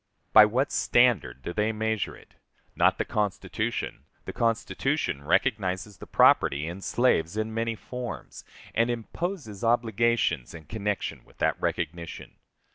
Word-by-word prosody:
By 110 -1 +10
what 125 +6 0
standard 95 - +2
do 85 - -4
they 105 +3 +1
measure 110 -1 -2
it? - - -20 0.4
Not - - +3
the - - -1
Constitution; 105 -3 -2 0.2
the - - -6
Constitution 115 -10 -1
recognizes 95 - 0
the - - -11
property 70 +2 +4
in 90 +3 -6
slaves 100 -6 +1
in 110 0 -2
many 115 0 -1
forms, 125 +2 -7 0.3
and 115 +2 +2
imposes 120 - -4
obligations 115 - +1
in 80 - -10
connection 105 +3 -3
with - - -23
that - - 0
recognition. 85 0 -4
110 Hz, 130 wpm, -27 LUFS, 90-115 Hz, 0.4 s, By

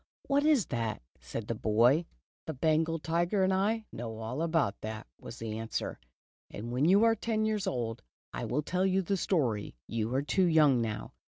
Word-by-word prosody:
"What 285 +1 +2
is 295 - +4
that?" 115 - -3 0.2
said 65 - -6
the - - -1
boy. 120 +9 +3 0.4
"The 160 - -3
Bengal 160 +3 +2
tiger 170 +5 +1
and 190 0 +3
I 215 +4 +1
know 115 -1 -6
all 115 +6 -4
about 160 -10 0
that," 110 0 -5
was 120 - -9
the 110 -1 -4
answer, 115 0 -4 0.5
"and 115 +3 -6
when 125 +4 +1
you 195 +6 +5
are 230 0 +5
ten 220 0 -1
years 215 -2 -1
old, 115 -10 -2 0.3
I - - -3
will 150 +5 -1
tell 180 +4 0
you 190 0 +2
the 195 +3 0
story. 130 - 0
You 115 0 -2
are 135 - +1
too 185 +5 +2
young 150 -7 +5
now." 110 -2 -4
155 Hz, 190 wpm, -30 LUFS, 115-190 Hz, 0.5 s, you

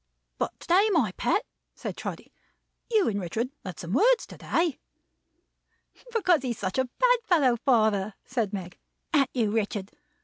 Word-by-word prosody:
"But - - -2
to - - -12
day, 385 +5 +5
my 300 - +2
pet," 245 - 0 0.3
said - - -5
Trotty. - - -7 0.6
"You 435 -4 +3
and 205 -2 0
Richard 225 +9 -2
had 185 -4 -7
some 175 +2 -5
words 470 - +4
to - - -12
day." 330 -3 0 1.3
"Because 365 - +3
he's 245 -4 -3
such 190 +5 -2
a 260 - +3
bad - - +5
fellow, 295 - +3
father," 220 -5 +2
said 230 -6 -1
Meg. 185 -3 -6 0.3
"An't 275 -4 +4
you, 225 -5 0
Richard? 205 -2 -2
245 Hz, 160 wpm, -27 LUFS, -, 1.3 s, day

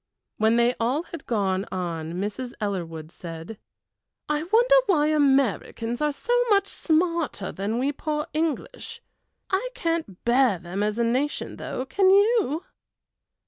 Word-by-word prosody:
When 220 +1 +3
they 235 0 +4
had 250 - -4
all 260 +9 0 0.2
gone 195 -4 0
on 170 -3 -3
Mrs. 210 +7 -4
Ellerwood 170 -6 -4
said: 170 +5 -8 0.7
"I 300 0 0
wonder 475 +6 +4
why 305 -6 +3
Americans 270 -4 +1
are 300 0 +2
so 480 - -2 0.2
much 400 -2 +4
smarter 335 - 0
than 205 +4 -2
we 270 +3 +1
poor 300 +1 -3
English? 330 +9 -3 0.5
I 390 +6 0
can't 330 - -2
bear 240 -4 +4
them 175 +4 -5
as 210 +1 0
a 235 - +2
nation 255 +6 -1
though, 255 - -4
can 380 +7 +3
you?" 400 - +3
255 Hz, 140 wpm, -25 LUFS, 200-325 Hz, 0.7 s, they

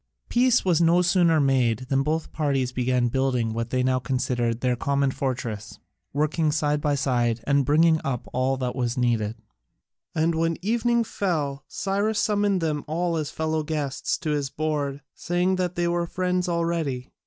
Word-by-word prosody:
Peace 245 -2 +3
was 170 -3 +3
no 170 +2 +4
sooner 175 -3 +3
made 130 -4 +2
than 135 0 +2
both 155 +3 -2
parties 135 -5 0
began 125 -1 +1
building 125 -3 0
what 115 +1 -3
they 130 +1 0
now 130 0 +2
considered 125 -3 -1
their 125 -1 +1
common 140 +2 0
fortress, 120 -6 -4 0.3
working 155 +2 +1
side 150 -1 0
by 145 -1 +1
side 120 -4 +1
and 140 0 +2
bringing 160 +2 +4
up 125 -4 -3
all 130 +1 +1
that 125 -1 -3
was 120 -1 -1
needed. 115 -3 0 0.8
And 160 +1 +2
when 165 0 0
evening 235 +2 +2
fell, 150 -10 -2
Cyrus 205 +2 -1
summoned 205 -4 +1
them 150 -3 -1
all 170 +2 -1
as 155 -2 -2
fellow 160 0 -1
guests 150 -2 -2
to 155 -4 -3
his 145 -2 -1
board, 145 -2 -2
saying 180 +2 0
that 180 -1 -1
they 175 0 0
were 170 0 0
friends 180 0 -1
already. 165 -7 -1
150 Hz, 165 wpm, -25 LUFS, 130-170 Hz, 0.8 s, no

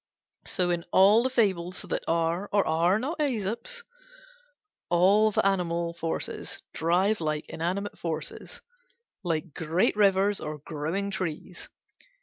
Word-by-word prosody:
So 180 -1 +1
in 170 -1 -1
all 200 +4 +6
the 260 - 0
fables 185 -7 0
that - - -3
are 170 +4 0
or 205 -1 +3
are 170 +5 +2
not 285 +9 -3
Æsop's 265 - -2 1.1
all 195 +5 +5
the 210 - 0
animal 170 -3 0
forces 165 -1 -4
drive 180 +5 +1
like 155 -1 -2
inanimate 185 +5 -3
forces, 160 -2 -5 0.6
like 165 -3 -2
great 165 +4 +1
rivers 200 0 +3
or 150 0 -5
growing 160 +7 -3
trees. 180 -1 -5
180 Hz, 125 wpm, -27 LUFS, 165-205 Hz, 1.1 s, all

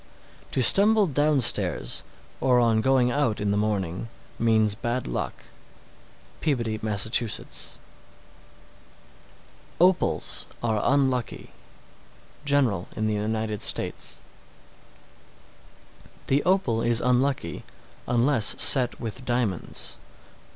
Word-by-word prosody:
_ - - -28 0.5
672. - - -2
To 125 - +9
stumble 210 +1 +6
downstairs, 145 - +2 0.4
or 125 -2 +2
on 115 -2 +2
going 130 -1 +2
out 120 -5 -1
in 105 -1 -1
the - - 0
morning, 105 -1 -2 0.3
means 110 -2 +2
bad 120 +3 -4
luck. - - -5 1.0
Peabody, 115 -8 -2
Mass. 105 -2 0
673. 115 0 -2 2.0
Opals 180 +2 0 0.2
are 110 -3 0
unlucky. 130 -4 -1 0.9
General 130 -11 0
in 110 - -2
the 110 - -1
United 110 0 -3
States. - - -2 2.1
674. 135 - +1
The 145 - +1
opal 155 -13 0
is 120 0 +1
unlucky, 125 - -1 0.4
unless 120 -2 +2
set 125 -3 +5
with 115 +2 -6
diamonds. 120 -7 -3
120 Hz, 100 wpm, -24 LUFS, 110-135 Hz, 2.1 s, To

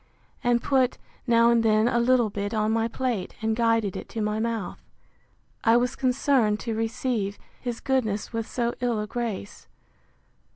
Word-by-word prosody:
and 240 -1 +2
put, 260 -3 +2 0.3
now 235 0 +5
and 235 -1 +4
then, 215 0 +3
a 240 -1 +2
little 240 -2 +3
bit 205 +2 -3
on 215 0 +1
my 225 0 +1
plate, 230 -5 -3
and 220 0 0
guided 230 -4 +1
it - - -7
to 230 - -5
my 210 0 -1
mouth. 225 -4 -3 0.8
I 230 +1 +5
was 245 +1 0
concerned 250 -4 +2
to 230 - -3
receive 225 -2 -2 0.2
his 240 -2 -4
goodness 240 -6 -1
with 225 -1 -2
so 240 -1 -1
ill 240 -3 0
a 210 - -2
grace. 220 - -5
230 Hz, 165 wpm, -26 LUFS, 215-240 Hz, 0.8 s, now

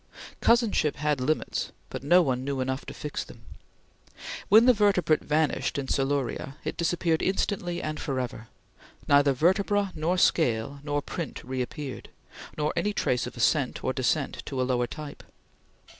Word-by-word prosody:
Cousinship 230 - +3
had 150 -2 0
limits 155 +5 -1 0.2
but - - -5
no 175 +6 +5
one 130 -4 -1
knew 140 0 -2
enough 130 +1 -2
to - - -5
fix 150 - -4
them. 115 - -14 1.1
When 220 +3 +8
the 250 - +7
vertebrate 195 -7 +3
vanished 150 -1 0
in 140 - -2
Siluria, 135 0 -1
it - - -3
disappeared 170 -1 0
instantly 180 -2 -1
and 155 0 -3
forever. 125 -5 -4 0.6
Neither 145 -1 +5
vertebra 195 +6 +2
nor 165 +3 0
scale 140 -6 +2
nor 145 -1 -1
print 170 -6 -5
reappeared, 130 +1 -5 0.5
nor 150 0 0
any 205 +5 0
trace 125 -10 0
of - - -9
ascent - - +1
or - - 0
descent - - 0
to 135 - -3
a - - +2
lower 125 -1 0
type. 150 +2 -8
150 Hz, 150 wpm, -27 LUFS, 135-175 Hz, 1.1 s, When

